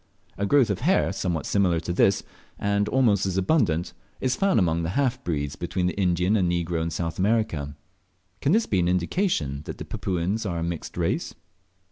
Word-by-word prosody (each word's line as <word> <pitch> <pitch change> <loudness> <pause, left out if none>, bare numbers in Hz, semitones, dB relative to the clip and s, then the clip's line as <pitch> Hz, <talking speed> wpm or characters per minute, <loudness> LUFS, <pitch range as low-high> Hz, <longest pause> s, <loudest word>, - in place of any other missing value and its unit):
A 100 - -1
growth 130 -2 +4
of 95 - -2
hair 175 - +2
somewhat 90 -4 -2
similar 90 -5 +2
to 85 +2 -3
this, 95 +2 +3 0.3
and 100 0 0
almost 105 -6 +3
as 95 -1 -2
abundant, 95 - +1 0.3
is 130 0 0
found 195 +3 +2
among 85 -4 +2
the 80 - -2
half 130 -3 0
breeds 75 -4 -2
between 90 +1 -2
the 90 - 0
Indian 90 +1 +2
and 90 -4 +2
Negro 85 -1 -1
in 80 - -1
South 85 +1 -4
America. 95 -9 0 0.7
Can 140 - +2
this 220 +4 +3
be 95 - 0
an 85 - +2
indication 90 - 0
that - - -6
the - - -7
Papuans 95 +4 -2
are 90 -5 -2
a 85 - -2
mixed 85 -1 -5
race? - - -1
90 Hz, 190 wpm, -25 LUFS, 85-110 Hz, 0.7 s, growth